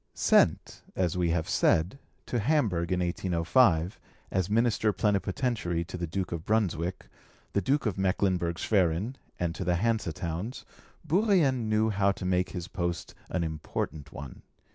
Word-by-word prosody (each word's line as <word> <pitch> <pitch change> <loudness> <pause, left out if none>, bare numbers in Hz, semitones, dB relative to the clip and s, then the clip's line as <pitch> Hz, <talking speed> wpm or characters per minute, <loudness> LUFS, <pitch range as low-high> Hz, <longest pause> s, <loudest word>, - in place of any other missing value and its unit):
Sent, - - +3
as 90 -3 0
we 90 -2 +1
have 80 -1 0
said, 90 +12 +2 0.3
to 120 - -1
Hamburg 105 - +1
in 90 0 +1
1805, 90 +1 +2 0.3
as 95 -1 0
Minister 110 0 +2
Plenipotentiary 100 -2 0
to 85 - -8
the 85 -1 -3
Duke 95 +3 -3
of 85 -2 -4
Brunswick, 95 -5 -1 0.5
the 100 - +2
Duke 140 +5 +1
of 100 -4 -1
Mecklenburg 90 -3 +1
Schwerin, 95 +4 +1 0.2
and 85 -1 -1
to 85 - -4
the 90 0 +1
Hanse 110 -1 0
towns, 85 - -5 0.4
Bourrienne 155 - +3
knew 110 +1 +2
how 100 -1 +2
to 95 - -7
make 90 0 +1
his 90 -2 -5
post 85 -1 -3 0.2
an 90 - -1
important 75 -2 -4
one. 70 -2 -9
95 Hz, 150 wpm, -29 LUFS, 85-110 Hz, 0.5 s, Sent